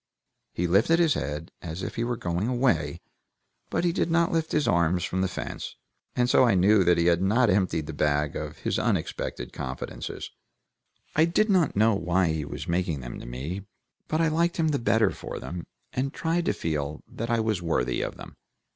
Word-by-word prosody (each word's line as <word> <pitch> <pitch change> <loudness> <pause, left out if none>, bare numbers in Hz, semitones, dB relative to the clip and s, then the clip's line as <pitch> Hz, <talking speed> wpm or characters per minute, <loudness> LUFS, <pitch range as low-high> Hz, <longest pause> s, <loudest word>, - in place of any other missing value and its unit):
He 90 - -1
lifted 100 - +4
his 165 -3 +4
head, 75 - -4
as 85 +2 -5
if - - -4
he 115 - -2
were 120 0 -1
going 90 +3 -1
away, 120 - +1 0.7
but - - 0
he 175 - +3
did 170 - 0
not 170 +1 +3
lift 165 -1 0
his 150 - +1
arms 85 0 +2
from 95 0 -1
the 95 - +2
fence, - - -6 0.4
and 125 0 +2
so 125 - +5
I 120 -5 +4
knew 95 +2 +5
that 90 0 +4
he 85 - +2
had 85 0 +3
not 110 +4 +3
emptied 90 -5 +1
the 80 - -6
bag 75 0 +1
of - - -5
his - - -1
unexpected - - -2
confidences; 65 0 -5 0.8
I 160 - +5
did 205 +6 +2
not 180 -6 +3
know 110 +2 +4
why 90 -1 +1
he 80 -2 -1
was 70 - -6
making 85 -4 0
them - - -7
to - - -9
me, 80 +11 -5 0.4
but 155 - 0
I 165 - +3
liked 170 +2 +1
him 160 -2 +2
the 145 - +1
better 110 -3 +3
for - - -7
them, 85 0 -6 0.3
and 135 +2 -1
tried 165 +3 -1
to - - +2
feel 75 -2 -3
that 115 +2 -5
I 115 -1 +2
was 110 -5 0
worthy 65 -7 0
of - - -4
them. - - -11
95 Hz, 205 wpm, -27 LUFS, 80-130 Hz, 0.8 s, so